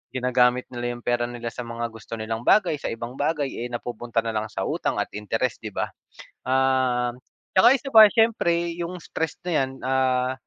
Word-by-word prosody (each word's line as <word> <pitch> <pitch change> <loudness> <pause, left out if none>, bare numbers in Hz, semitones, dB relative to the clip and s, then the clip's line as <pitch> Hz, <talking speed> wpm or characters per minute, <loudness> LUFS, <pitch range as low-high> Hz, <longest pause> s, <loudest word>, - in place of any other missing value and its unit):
ginagamit 125 0 +2
nila 120 0 -3
'yung 120 - -11
pera 120 0 +1
nila 120 -1 -5
sa 125 - -5
mga 115 0 -4
gusto 115 0 -11
nilang 110 +1 -3
bagay 185 -7 +4
sa - - -2
ibang 120 +2 -7
bagay, 145 -1 0 0.2
eh, - - -17
napupunta 120 -1 -3
nalang 110 -1 -1
sa 95 - -5
utang - - -1
at - - -4
interest, 115 +4 -1
di 110 - -5
ba? - - -2 0.6
Um, 130 -2 +1 0.4
tsaka 185 - +7
isa 270 +1 -8
pa, 220 -2 +10
siyempre 170 -7 +2
'yung 175 +1 -4
stress 160 -1 -3
na 180 - -2
'yan 135 -3 +1
ah 130 -1 +1
125 Hz, 185 wpm, -24 LUFS, 120-145 Hz, 0.6 s, pa